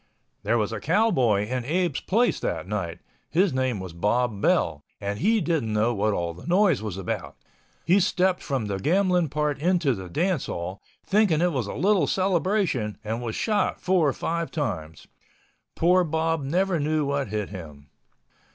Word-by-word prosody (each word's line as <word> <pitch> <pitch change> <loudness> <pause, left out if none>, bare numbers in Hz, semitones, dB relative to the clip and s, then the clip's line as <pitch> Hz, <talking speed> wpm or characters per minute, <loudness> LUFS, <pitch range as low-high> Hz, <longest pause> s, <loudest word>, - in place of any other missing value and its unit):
There 120 - +1
was 105 -2 0
a 110 - -4
cowboy 130 - +2
in 125 +1 -2
Abe's 175 +6 0
place 235 +5 +1
that - - -3
night. 90 -5 -4 0.3
His 180 +1 +2
name 130 -4 0
was 95 -3 -7
Bob 105 +4 0
Bell 70 - +1 0.2
and 100 0 -3
he 220 +5 +3
didn't 160 -10 0
know 110 +3 +2
what 105 0 +1
all 85 -4 -2
the 90 - -12
noise 180 - +3
was 105 -4 -5
about. 95 - -4 0.5
He 185 +4 +5
stepped 185 0 +1
from 135 -6 -2
the 100 -2 -3
gambling 180 - +2
part 150 0 -1
into 170 -3 +2
the 95 -4 -7
dance 175 - 0
hall, 90 +3 -5 0.2
thinking 200 -6 +3
it 175 +1 +2
was 125 -6 -1
a - - -5
little 190 - +2
celebration 185 - 0
and 110 +2 -3
was 115 -2 -4
shot 210 -2 0
four 180 -4 +2
or - - -1
five 170 0 -2
times. 80 - -4 0.7
Poor 180 +2 +4
Bob 160 0 0
never 175 +5 +1
knew 155 0 0
what 140 -1 -1
hit 105 -1 -3
him. 75 -7 -10
140 Hz, 175 wpm, -25 LUFS, -, 0.7 s, He